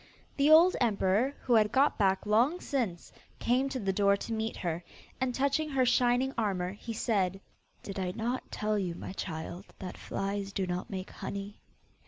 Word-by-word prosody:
The 285 +1 +3
old 330 +4 +7
emperor, 220 +3 +2
who 245 - +1
had 215 -2 +5
got 275 +1 +3
back 195 -1 +2
long 240 +11 +3
since, 225 - -2 0.3
came 255 +3 +1
to 265 - -3
the 195 -3 0
door 200 0 +3
to 230 - -5
meet 220 0 -2
her, 170 -1 -3 0.4
and 260 -1 +1
touching 280 +3 +1
her 265 -3 +2
shining 245 +2 +3
armour, 185 -4 0
he 210 +4 -7
said, 195 -5 0 0.4
'Did 195 -1 -5
I 185 -1 -1
not 240 +3 -2
tell 215 0 0
you, 180 -3 -2
my 185 - -7
child, 175 +1 -5
that 185 -2 -7
flies 200 0 -3
do 195 - 0
not 180 0 -3
make 190 -1 -5
honey? 200 +1 -6
210 Hz, 180 wpm, -30 LUFS, 190-255 Hz, 0.4 s, old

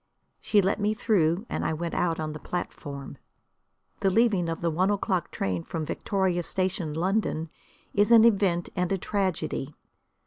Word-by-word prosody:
She 205 -2 +3
let 195 +3 +1
me 210 +1 +1
through, 190 -3 +1
and - - -3
I - - 0
went 170 +2 -3
out 165 -2 0
on 155 -1 -3
the 155 - -7
platform. 140 -5 -6 0.8
The 195 - +2
leaving 195 -5 +2
of 165 - -4
the 170 -1 +1
one 185 +5 +2
o'clock 195 -3 0
train 90 -3 -2
from 160 -2 -4
Victoria 185 +1 0
Station, 185 -3 -2
London, 170 -3 0 0.4
is 205 +2 +3
an 230 -1 +8
event 195 -6 +2
and 180 -1 0
a 195 - +2
tragedy. 185 -7 -2
180 Hz, 165 wpm, -27 LUFS, 165-200 Hz, 0.8 s, an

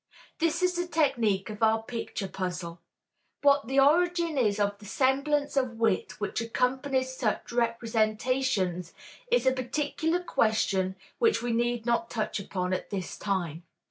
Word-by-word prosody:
This 330 +2 +1
is 365 0 +3
the 350 0 -1
technique 235 - +1
of 210 - -9
our 220 0 +3
picture 225 -3 -4
puzzle. 180 -2 -4 0.6
What 280 -2 +4
the 270 +2 +2
origin 340 +3 +3
is 215 -6 +2
of 205 0 0
the 210 - -13
semblance 280 +6 +1
of 255 -4 0
wit 225 -4 0
which 205 +2 -2
accompanies 260 +3 0
such 225 -4 -2
representations 225 -5 0 0.4
is - - +3
a 260 - +5
particular 300 +6 -1
question 200 - +1 0.2
which 450 - +3
we 240 - -1
need 240 0 0
not 235 -1 +1
touch 215 -2 -2
upon 185 -2 -2
at 185 - -3
this 190 -3 -4
time. 175 -5 -2
235 Hz, 145 wpm, -28 LUFS, 205-275 Hz, 0.6 s, a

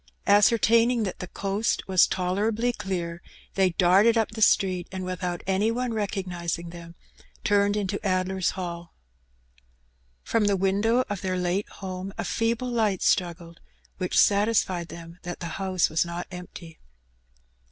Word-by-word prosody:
Ascertaining 230 +3 +4
that 190 - -4
the 180 - -5
coast 200 +4 -2
was 190 -1 +5
tolerably 210 +6 0
clear^ 175 -5 -4 0.3
they 190 -1 +3
darted 190 +6 +4
up 225 - +1
the 220 0 -7
street^ 185 -4 +3
and 190 -1 -5
withont 180 -1 -4
any 195 +3 +1
one 245 +1 -1
recog 205 -3 -2
nizing 170 -1 -4
them^ 170 -1 -11 0.5
turned 205 0 +2
into 200 -1 -2
Addler's 185 -1 0
Hall. 170 -2 -6 1.3
From 225 -2 +1
the 200 -1 +2
window 205 +6 +2
of 205 -2 -4
their 185 -1 -1
late 180 +3 -1
home 190 0 -7
a - - -2
feeble 230 +2 -1
light 215 -5 +1
struggled^ 170 -1 0 0.4
which 180 -1 -1
satisfied 200 -4 +3
them 170 +1 -11
that 175 0 -6
the 170 +2 -5
house 185 -2 +2
was 160 - +1
not 170 0 -5
empty. 175 -2 -10
190 Hz, 145 wpm, -26 LUFS, 175-210 Hz, 1.3 s, was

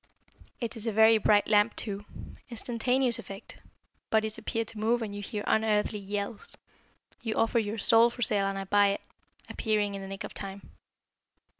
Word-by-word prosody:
It 235 -1 -4
is 225 0 -6
a - - +1
very 220 +1 +6
bright 205 0 +3
lamp, 210 +1 +3
too. 205 -1 -2 0.4
Instantaneous 245 +1 0
effect 195 0 -10 0.5
bodies 220 -1 +1
appear 230 -1 -2
to 220 0 -5
move 230 +2 +1
and 210 -2 -5
you 205 - -5
hear 205 +1 -4
unearthly 215 -1 +1
yells 200 +2 -5 0.6
you 225 -2 -3
offer 225 +1 +2
your 215 0 -3
soul 230 +2 +5
for 245 +1 -4
sale 205 -2 +3
and 195 0 -2
I 195 - -3
buy 205 +1 +4
it, - - -6 0.5
appearing 210 -2 0
in 195 - -5
the 195 - -7
nick 195 0 -6
of - - -7
time? 195 0 -7
215 Hz, 175 wpm, -29 LUFS, 205-225 Hz, 0.6 s, very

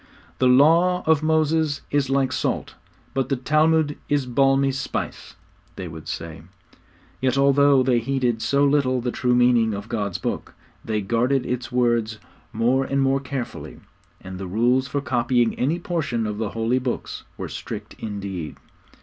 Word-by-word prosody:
'The 130 - +4
law 165 +8 +4
of 160 -2 +3
Moses 155 -1 +1
is 140 -2 +1
like 135 -1 +1
salt, 130 - -2 0.4
but 135 -2 -1
the 135 - +2
Talmud 155 +3 +2
is 145 -2 +1
balmy 135 +2 +2
spice,' 135 +1 -5 0.4
they 95 - -6
would 80 -1 -10
say. 80 -2 -6 0.8
Yet 130 0 +1
although 140 -1 +4
they 125 -2 +2
heeded 120 -2 -1
so 140 +3 +2
little 140 -3 +2
the 120 0 -2
true 125 0 +1
meaning 120 -3 +3
of 100 +2 -7
God's 100 -6 -2
Book, - - -4 0.3
they 110 -1 -1
guarded 125 +6 +1
its 125 0 -3
words 120 -3 +1 0.3
more 120 +4 +1
and 140 +1 -1
more 135 0 +2
carefully; 135 -2 -6 0.4
and 95 0 -9
the 95 - -5
rules 120 +7 +2
for 140 +1 -2
copying 120 -2 +1
any 145 +7 +1
portion 150 -10 -2
of 105 0 -4
the 110 -2 -1
holy 115 +4 0
Books 125 -1 -4 0.2
were - - -5
strict - - -7
indeed. 100 -6 -5
130 Hz, 160 wpm, -23 LUFS, 115-140 Hz, 0.8 s, The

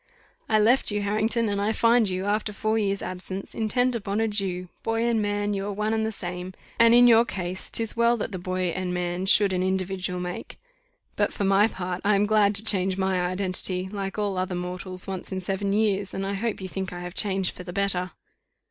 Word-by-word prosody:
"I 215 - +4
left 230 +5 +4
you, 205 -1 -1
Harrington, 220 +3 +1
and 200 -1 -1
I 205 +2 +1
find 230 -1 +3
you, 185 +1 -2
after 210 +1 0
four 215 +1 -1
years' 200 -2 -1
absence, 185 +1 -6
intent 245 +3 +1
upon 200 -2 -2
a 225 - +2
Jew; 190 -4 -1
boy 225 0 -1
and 235 -2 +1
man 205 0 -1
you 195 -1 -2
are - - -2
one 210 +2 -1
and 220 0 0
the - - -2
same; 180 -2 -6 0.2
and 230 0 +7
in 245 0 +7
your 230 -1 +7
case, 185 -4 -5
'tis 225 -1 -1
well 235 +1 +3
that 225 - -4
the 185 - -5
boy 185 0 -2
and 180 +1 -3
man 180 +1 -2
should 200 0 +4
an 180 - 0
individual 185 -1 -1
make; 180 0 -6 0.6
but - - +1
for - - -3
my 195 +2 +4
part, 180 -4 -5
I 205 0 +3
am 200 +1 +3
glad 210 -1 +3
to 205 +2 +4
change 190 -3 +4
my 190 -1 +1
identity, 185 0 -1
like 195 -1 -4
all 200 -3 -1
other 185 0 -2
mortals, 180 +1 -5
once 190 -1 -6
in 190 - -2
seven 195 +2 -2
years; 205 -2 0
and 195 - -2
I 195 - -2
hope 210 +1 -2
you 190 - -4
think 190 0 -4
I 175 0 -7
have 175 0 -6
changed 190 -2 0
for - - -9
the 175 - -7
better." 185 -1 -1
195 Hz, 225 wpm, -25 LUFS, 185-215 Hz, 0.6 s, and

